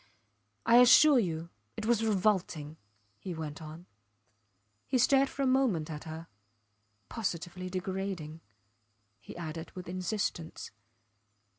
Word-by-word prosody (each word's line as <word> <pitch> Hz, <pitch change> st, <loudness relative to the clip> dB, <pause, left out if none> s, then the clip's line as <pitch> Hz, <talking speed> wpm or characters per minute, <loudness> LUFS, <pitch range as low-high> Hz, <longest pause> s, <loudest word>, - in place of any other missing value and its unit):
I 235 Hz, -, +6 dB
assure 255 Hz, +3 st, +8 dB
you 170 Hz, -4 st, -3 dB, 0.3 s
it -, -, -4 dB
was 230 Hz, -1 st, +2 dB
revolting, 185 Hz, -7 st, 0 dB, 0.4 s
he 180 Hz, -3 st, -6 dB
went 155 Hz, -1 st, -6 dB
on. 160 Hz, +3 st, -10 dB, 1.0 s
He 260 Hz, -, +1 dB
stared 270 Hz, +2 st, +4 dB
for 275 Hz, -, -3 dB
a -, -, +2 dB
moment 245 Hz, -, +1 dB
at 150 Hz, -1 st, -7 dB
her. 160 Hz, +1 st, -7 dB, 0.8 s
Positively 185 Hz, -3 st, -4 dB
degrading, 185 Hz, -4 st, -4 dB, 0.8 s
he -, -, -11 dB
added 165 Hz, -1 st, -6 dB
with 185 Hz, -1 st, -8 dB
insistence. 180 Hz, -2 st, -3 dB
185 Hz, 115 wpm, -31 LUFS, 160-225 Hz, 1.0 s, assure